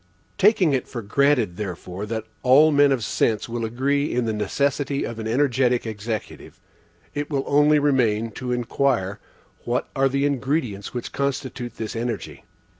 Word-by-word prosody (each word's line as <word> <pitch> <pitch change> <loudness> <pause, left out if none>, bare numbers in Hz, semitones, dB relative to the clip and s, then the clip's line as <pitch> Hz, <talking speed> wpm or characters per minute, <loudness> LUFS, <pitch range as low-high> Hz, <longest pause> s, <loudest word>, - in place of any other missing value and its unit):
Taking 195 -6 +4
it 130 - -1
for 120 -4 -6
granted, 120 -4 +2
therefore, 95 0 -5
that 110 0 -3 0.2
all 145 +5 +6
men 145 -1 +5
of 130 -4 0
sense 110 -1 0
will 115 0 -4
agree 140 +6 0
in 125 -1 0
the 110 - -1
necessity 140 +6 -1
of 115 -1 -6
an 110 - -4
energetic 125 0 +2
Executive, 110 0 -6 0.5
it 145 0 -3
will 140 -3 -1
only 150 +1 +4
remain 120 -6 +2
to 125 +3 -5
inquire, 120 -4 0 0.4
what 120 +1 -1
are 135 0 +3
the 140 +1 0
ingredients 135 -7 -1
which 120 -1 -5
constitute 130 -3 -3
this 110 0 -5
energy? 115 -2 -4
125 Hz, 155 wpm, -23 LUFS, 110-140 Hz, 0.5 s, all